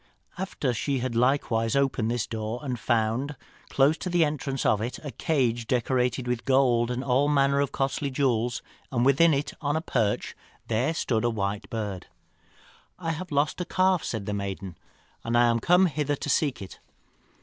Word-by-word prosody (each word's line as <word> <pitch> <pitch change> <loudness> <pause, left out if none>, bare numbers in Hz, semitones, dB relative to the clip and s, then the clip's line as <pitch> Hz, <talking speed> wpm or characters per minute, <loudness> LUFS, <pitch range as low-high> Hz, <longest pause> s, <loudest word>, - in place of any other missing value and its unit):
After 180 -8 -2
she 135 +4 -1
had 125 -1 -2
likewise 115 -2 +1
opened 135 -5 +1
this 120 -2 -1
door 110 +1 -4
she 125 - -1
found, 120 +5 0 0.3
close 145 +4 +3
to 185 - -4
the 175 -2 +3
entrance 140 -3 -3
of 105 -1 +3
it, 120 +2 -3
a 145 - -4
cage 120 -8 0
decorated 125 0 0
with 125 -1 -1
gold 125 -3 +3
and 125 +1 -2
all 135 +3 +2
manner 140 -1 +3
of 140 - -1
costly 135 +1 -1
jewels, 125 -3 0 0.3
and 120 -2 +1
within 140 +5 +5
it, 140 0 -1
on 145 0 0
a - - +2
perch, 110 -9 -1 0.3
there 125 +8 0
stood 115 -7 0
a 120 - +2
white 100 -2 -3
bird. 105 -5 -4 0.9
"'I 165 -3 -2
have 165 +3 -6
lost 145 +4 0
a - - -2
calf,' 185 -1 +2
said 110 -4 -4
the 105 - -3
maiden, 100 -2 -4 0.5
'and 115 +1 0
am 120 -1 +4
come 180 +8 +4
hither 150 -3 0
to 145 - -5
seek 140 -8 +1
it.' 95 - -11
130 Hz, 180 wpm, -26 LUFS, 115-145 Hz, 0.9 s, within